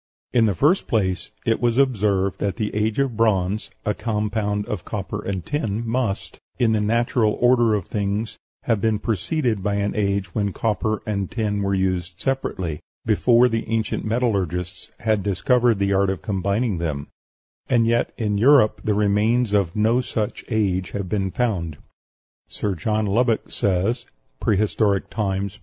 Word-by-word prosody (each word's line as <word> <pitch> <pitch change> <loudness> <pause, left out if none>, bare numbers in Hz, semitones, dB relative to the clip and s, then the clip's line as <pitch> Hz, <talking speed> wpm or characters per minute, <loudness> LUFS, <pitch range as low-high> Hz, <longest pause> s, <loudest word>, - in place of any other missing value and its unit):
In 115 -2 +4
the 100 - 0
first 155 - +2
place, 95 -5 0 0.2
it 115 +1 +1
was 120 0 +2
observed 100 -7 +2
that 100 -2 -1
the 110 -3 -3
age 105 +1 0
of 135 -4 0
bronze 105 -2 +1 0.2
(a 105 - +1
compound 105 -2 -1
of 105 -4 -4
copper 105 0 -5
and 95 -3 -3
tin) 115 -6 -2
must, 115 -4 -2 0.2
in 115 -2 +3
the 110 -1 +2
natural 115 +1 +2
order 120 -3 +3
of 100 -4 -2
things, 105 +1 -2 0.2
have 115 -4 +1
been 110 0 +2
preceded 115 - -1
by 100 +1 0
an 100 0 0
age 100 -3 -1
when 100 -3 -1
copper 110 -1 -1
and 100 -3 -2
tin 105 -3 -1
were 100 0 0
used 95 -2 -1
separately, 95 - -2 0.3
before 120 +3 +4
the 115 -2 -2
ancient 115 -2 -1
metallurgists 95 -6 -1
had 110 -3 +1
discovered 115 +5 +2
the 100 0 +1
art 100 0 +3
of 95 -5 -3
combining 100 +1 0
them, 75 -4 -3 0.6
and 120 -2 +3
yet 120 +1 +1
in 105 -3 0
Europe 125 -2 +5
the 105 - +1
remains 105 +3 +2
of 100 -5 +1
no 110 +4 +3
such 110 -4 -3
age 95 -6 0
have 100 -3 -3
been 95 -1 0
found. 90 - -1 0.7
Sir 105 - -2
John 105 +5 -1
Lubbock 115 +3 +1
says 100 +6 0 0.3
("Prehistoric 105 -1 +1
Times," 100 -1 -2
p. - - -27
105 Hz, 160 wpm, -22 LUFS, 100-115 Hz, 0.7 s, Europe